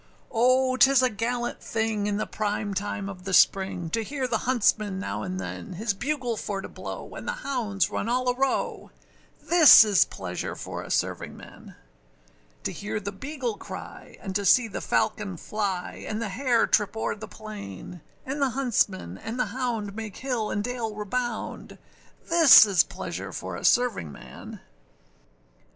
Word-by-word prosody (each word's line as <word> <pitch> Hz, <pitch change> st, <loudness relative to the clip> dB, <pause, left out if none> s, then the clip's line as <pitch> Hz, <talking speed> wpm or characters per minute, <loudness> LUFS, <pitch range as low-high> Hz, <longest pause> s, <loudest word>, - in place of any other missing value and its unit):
O 255 Hz, +2 st, +3 dB
âtis 270 Hz, 0 st, +5 dB
a 255 Hz, -, +3 dB
gallant 240 Hz, +3 st, -2 dB
thing 220 Hz, -2 st, -1 dB
in 205 Hz, -1 st, 0 dB
the -, -, -1 dB
prime 205 Hz, -1 st, -2 dB
time 200 Hz, 0 st, -3 dB
of 185 Hz, -2 st, -8 dB
the 190 Hz, 0 st, 0 dB
spring, 190 Hz, -3 st, +3 dB
To 225 Hz, -, 0 dB
hear 265 Hz, +3 st, -3 dB
the 225 Hz, -3 st, 0 dB
huntsman 215 Hz, -5 st, +2 dB
now 200 Hz, -, -4 dB
and 185 Hz, 0 st, -4 dB
than 195 Hz, +1 st, -6 dB
His 205 Hz, +4 st, -1 dB
bugle 250 Hz, +1 st, -2 dB
for 200 Hz, -1 st, -3 dB
to -, -, -6 dB
blow, -, -, -8 dB
and -, -, -8 dB
the 485 Hz, -, 0 dB
hounds 220 Hz, -8 st, 0 dB
run 225 Hz, -, -2 dB
all 250 Hz, +1 st, 0 dB
a 250 Hz, -, +3 dB
row: 270 Hz, +1 st, -1 dB, 0.5 s
This 330 Hz, -8 st, +9 dB
is 205 Hz, -4 st, +4 dB
pleasure 90 Hz, -1 st, -5 dB
for -, -, -6 dB
a -, -, -10 dB
servingman! -, -, -4 dB, 0.9 s
To -, -, -2 dB
hear 210 Hz, +1 st, -4 dB
the 200 Hz, -1 st, -5 dB
beagle 255 Hz, +1 st, -4 dB
cry, -, -, -9 dB
and 190 Hz, -2 st, -6 dB
to 200 Hz, -, +1 dB
see 230 Hz, +5 st, +5 dB
the 210 Hz, -, -6 dB
falcon 210 Hz, -4 st, -1 dB
fly, 195 Hz, 0 st, -3 dB
And 215 Hz, -, -3 dB
the 230 Hz, -2 st, -3 dB
hare 240 Hz, +3 st, +2 dB
trip 210 Hz, +1 st, +1 dB
over -, -, -1 dB
the 220 Hz, +1 st, -9 dB
plain, 185 Hz, -, -9 dB, 0.2 s
And 275 Hz, +2 st, -4 dB
the 275 Hz, -, +3 dB
huntsmen 210 Hz, -, -1 dB
and 230 Hz, +3 st, -6 dB
the -, -, +2 dB
hound 230 Hz, -6 st, -2 dB
make 220 Hz, -3 st, -6 dB
hill 245 Hz, -5 st, -2 dB
and 205 Hz, -, -1 dB
dale 235 Hz, -3 st, -3 dB
rebound: 235 Hz, +3 st, -4 dB, 0.5 s
This 330 Hz, -9 st, +9 dB
is 195 Hz, -4 st, +4 dB
pleasure -, -, -6 dB
for -, -, -6 dB
a -, -, -8 dB
servingman! 225 Hz, -, -1 dB
220 Hz, 170 wpm, -26 LUFS, 200-250 Hz, 0.9 s, This